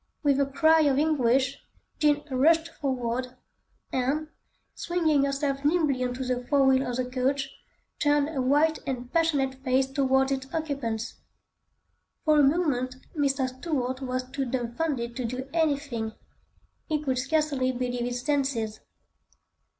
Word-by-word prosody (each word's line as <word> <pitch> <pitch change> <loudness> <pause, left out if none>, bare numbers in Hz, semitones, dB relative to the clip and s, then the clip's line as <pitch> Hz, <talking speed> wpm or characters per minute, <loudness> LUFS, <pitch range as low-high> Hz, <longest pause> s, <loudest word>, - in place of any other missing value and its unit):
With 280 -2 +3
a 280 - +2
cry 320 +3 +4
of 280 -3 +3
anguish, 270 -3 +2 0.4
Jean 295 -1 +3
rushed 320 +5 +3
forward 255 -3 -3 0.6
and, 280 +5 0 0.4
swinging 315 -5 +1
herself 275 0 -1
nimbly 295 -4 +2
on 250 0 -2
to 260 - -4
the 250 0 -1
fore 275 +1 +3
wheel 265 -1 +3
of 245 - -2
the 255 0 -1
coach, 265 +2 -1 0.5
turned 290 -1 +3
her 300 -4 -2
white 295 +5 +3
and 250 -2 -4
passionate 275 -6 +1
face 260 0 +2
towards 265 0 +1
its 265 0 -3
occupants. 270 -8 -3 1.1
For 305 -1 +5
a - - +6
moment, 270 -4 +1 0.2
Mr. 275 -3 +1
Stuart 260 -1 -3
was 255 -1 -2
too 270 +1 -3
dumbfounded 240 0 -2
to 255 - -2
do 255 +3 -4
anything; 285 -9 0 0.7
he 310 -2 0
could 265 -4 -1
scarcely 280 -2 +1
believe 245 -1 -3
his 245 0 -3
senses. 265 -7 0
270 Hz, 140 wpm, -27 LUFS, 255-295 Hz, 1.1 s, a